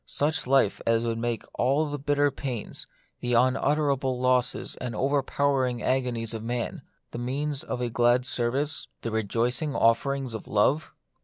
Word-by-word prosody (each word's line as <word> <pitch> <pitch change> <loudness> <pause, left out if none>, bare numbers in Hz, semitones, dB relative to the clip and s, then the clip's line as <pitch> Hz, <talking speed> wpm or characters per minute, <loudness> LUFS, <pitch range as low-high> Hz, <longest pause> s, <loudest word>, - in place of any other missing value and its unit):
Such 145 -2 0
life 130 -6 +3
as 115 0 +3
would 115 -1 -1
make 120 -1 -1
all 140 +5 +2
the 145 0 -4
bitter 145 0 +2
pains, 125 -7 -5 0.3
the 120 0 -1
unutterable 135 +1 +2
losses 125 -1 +1
and 125 -3 -5
overpowering 135 -1 +1
agonies 125 -3 0
of 110 - -4
man, 120 +1 -3 0.3
the - - -5
means 140 +3 -2
of 125 - -4
a 120 - -1
glad 120 +2 +3
service, 130 +4 0 0.2
the 115 - -2
rejoicing 115 +7 0
offerings 130 +2 +2
of 110 - -7
love 130 +9 +2
125 Hz, 150 wpm, -27 LUFS, 120-140 Hz, 0.3 s, life